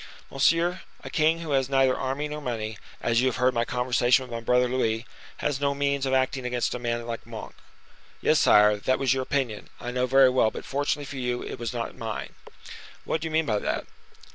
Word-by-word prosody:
"Monsieur, 165 +7 +2 0.2
a - - -8
king 160 +2 +2
who 160 -3 -5
has 135 -1 +1
neither 135 -1 +3
army 135 +3 -2
nor 150 0 -6
money, 110 -5 -4 0.2
as 115 0 +2
you 130 - +2
have 130 - 0
heard 125 +1 +2
my 115 -1 +1
conversation 125 +1 +2
with 125 - -11
my 115 - -3
brother 125 +2 +2
Louis, 115 -2 0 0.3
has 145 -3 -1
no 140 0 +1
means 140 -1 0
of 130 - 0
acting 130 0 0
against 125 -1 -1
a 125 - -4
man 120 -1 -2
like 115 -1 -6
Monk." 115 -2 -8 0.7
"Yes, - - +3
sire, 105 0 +6
that 130 +5 +1
was 130 -2 +2
your 130 - -1
opinion, 130 -5 -2
I 120 - -5
know 125 0 0
very 135 0 +6
well: 125 -4 +3
but, - - -8
fortunately 145 +1 -1
for 135 - -7
you, 125 -1 -2
it - - -7
was 120 -1 -3
not 120 -2 -4
mine." 115 -4 -5 0.7
"What 160 - -1
do 160 - -2
you - - -6
mean 160 0 +2
by 105 -6 0
that?" - - -2
130 Hz, 220 wpm, -26 LUFS, 120-140 Hz, 0.7 s, sire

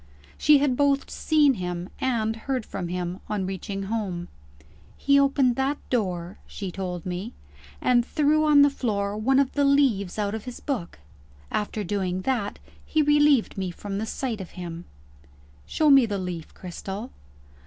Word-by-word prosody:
She 300 0 +5
had 275 -2 +2
both 280 0 +1
seen 300 -3 +3
him 180 -3 -4
and 225 -4 0
heard 250 0 -3
from 180 -3 -5
him, 180 +1 -3
on 205 -3 -1
reaching 195 +1 -4
home. 195 -4 -3 0.7
"He 280 0 +4
opened 275 -3 +3
that 270 +2 0
door," 185 -6 -2
she 195 -3 -6
told 180 -2 -5
me, 185 +6 -4 0.5
"and 245 -1 +3
threw 305 +3 +2
on 295 -2 +6
the 285 - +4
floor 205 -6 -1
one 250 +6 +2
of 275 -1 +3
the 285 - +1
leaves 265 -10 +2
out 205 -1 -1
of 220 -1 -5
his 250 -1 -7
book. 240 - -4 0.5
After 210 0 -2
doing 185 -1 -2
that, 230 -5 -1 0.3
he 310 -1 +1
relieved 295 -7 +3
me 190 -1 -2
from 195 +3 -5
the 220 - -3
sight 230 -5 -3
of 185 - -8
him." 170 -1 -6 0.8
"Show 305 -2 +3
me 270 -4 +7
the 205 -2 -2
leaf, 180 -4 -5
Cristel." 195 +6 -7
215 Hz, 165 wpm, -25 LUFS, 185-275 Hz, 0.8 s, me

